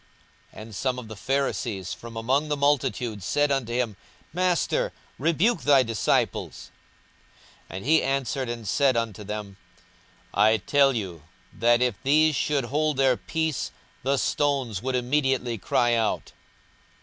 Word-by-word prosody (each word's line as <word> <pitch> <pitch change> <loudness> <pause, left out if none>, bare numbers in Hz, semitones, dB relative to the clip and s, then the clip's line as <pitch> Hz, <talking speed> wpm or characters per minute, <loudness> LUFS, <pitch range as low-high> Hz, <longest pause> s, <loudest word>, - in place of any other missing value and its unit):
42:019:039 - - -9
And 110 -1 -11
some 130 +1 -1
of 125 -3 -7
the 110 - -7
Pharisees 120 -6 -2
from 115 -1 -10
among 130 +7 +1
the 150 -1 -1
multitude 130 -6 0
said 145 +9 +1
unto 135 -4 -1
him, 120 -3 -1 0.4
Master, 180 -1 +1 0.3
rebuke 170 - +2
thy 140 -2 +5
disciples. 115 -3 -1 1.0
42:019:040 95 - -6
And 95 - -8
he 160 +3 +4
answered 135 -1 -1
and 115 -2 -5
said 130 +4 +2
unto 110 -3 -3
them, 105 -1 -6 0.8
I 110 +2 +4
tell 135 +6 +3
you 95 - -4 0.3
that, 120 +2 +3
if 125 -2 +1
these 155 +3 +4
should 140 -2 0
hold 150 +3 0
their 135 -2 +4
peace, 160 +1 -2 0.3
the 135 +2 +1
stones 135 -9 0
would 130 +1 -2
immediately 125 -2 0
cry 120 +5 +2
out. 115 -2 0
130 Hz, 145 wpm, -25 LUFS, 115-140 Hz, 1.0 s, thy